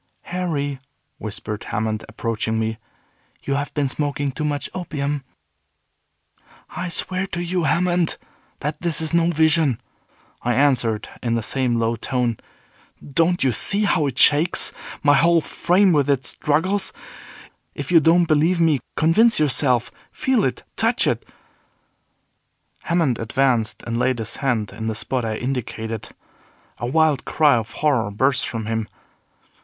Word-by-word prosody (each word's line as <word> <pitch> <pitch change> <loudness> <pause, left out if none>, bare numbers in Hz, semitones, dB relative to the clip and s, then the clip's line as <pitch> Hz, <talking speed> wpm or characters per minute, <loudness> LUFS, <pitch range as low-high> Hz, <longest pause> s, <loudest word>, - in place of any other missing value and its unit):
"Harry," 150 -7 -3 0.4
whispered 105 0 -6
Hammond, 110 0 -2
approaching 110 0 -2
me, 110 0 -2 0.6
"you 140 - -1
have 140 +1 -2
been 145 -2 +1
smoking 145 0 -2
too 140 - -5
much 145 -1 -1
opium." 145 -5 -3 1.5
"I 180 - -4
swear 185 +3 -2
to 170 - -5
you, 175 -1 -1
Hammond, 175 +2 +1 0.4
that 150 +1 -3
this 170 -4 0
is 160 0 -1
no 170 0 +3
vision," 160 -5 +2 0.6
I 120 0 0
answered, 125 -6 +2
in 115 -1 0
the 115 - -1
same 125 0 0
low 115 0 +1
tone. 120 -1 -1 0.7
"Don't 165 +4 +1
you 130 - +3
see 200 - +1
how 160 -7 +2
it 130 -2 -5
shakes 155 +7 +4 0.3
my 145 -1 +5
whole 170 +3 +4
frame 185 +4 +2
with 145 -2 +2
its 135 -2 +1
struggles? 175 +7 0 0.8
If - - -5
you 170 - +7
don't 165 +3 +4
believe 160 +3 +2
me, 160 -4 +3 0.2
convince 190 +8 +4
yourself. 130 -5 +2 0.2
Feel 260 -5 +1
it, 130 - -2
touch - - +2
it." - - 0 1.6
Hammond 165 -8 +1
advanced 120 -1 0
and 115 0 -3
laid 130 0 +1
his 110 -1 -5
hand 115 -7 -1
in 110 - -5
the 110 - -2
spot 125 +3 -2
I 110 -1 -2
indicated. 115 -3 -4 0.7
A 120 - -2
wild 155 0 +2
cry 150 -2 +3
of 115 -1 -3
horror 130 -9 +2
burst 130 +5 +1
from 110 0 -4
him. 110 -1 -2
140 Hz, 145 wpm, -22 LUFS, 115-165 Hz, 1.6 s, you